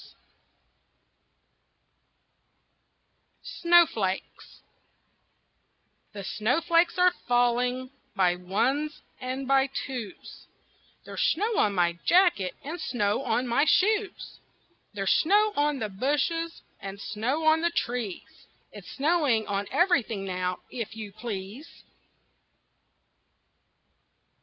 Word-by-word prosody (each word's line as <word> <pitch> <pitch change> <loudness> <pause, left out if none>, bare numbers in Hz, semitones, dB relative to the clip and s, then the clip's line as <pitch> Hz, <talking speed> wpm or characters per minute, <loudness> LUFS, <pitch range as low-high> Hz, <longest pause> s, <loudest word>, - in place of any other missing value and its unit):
SNOWFLAKES 330 - +1 1.5
The 200 -1 -7
snowflakes 330 - +1
are 360 0 +4
falling 245 +1 +1 0.2
by 180 -3 +3
ones 255 +12 -1 0.2
and 260 +1 -4
by 270 0 +4
twos; 255 -5 -7 0.6
There's - - -5
snow 425 +7 +1
on 205 -1 +2
my 170 -1 +1
jacket, 345 - +3
and 320 +5 -6
snow 210 -2 0
on 255 -2 0
my 245 +5 +2
shoes; 405 +5 +1 0.6
There's 195 -1 0
snow 415 +5 +3
on 295 0 +1
the 220 -4 -3
bushes, 295 - -1 0.2
and 195 0 -8
snow 250 +10 -2
on 315 +1 +4
the 340 - +2
trees 240 - -4 0.2
It's - - -11
snowing 285 -7 +1
on 200 0 -2
everything 250 - +1
now, 180 -1 -3
if 230 -3 -5
you 215 -2 -7
please. 210 +5 -7
255 Hz, 95 wpm, -27 LUFS, 205-320 Hz, 1.5 s, are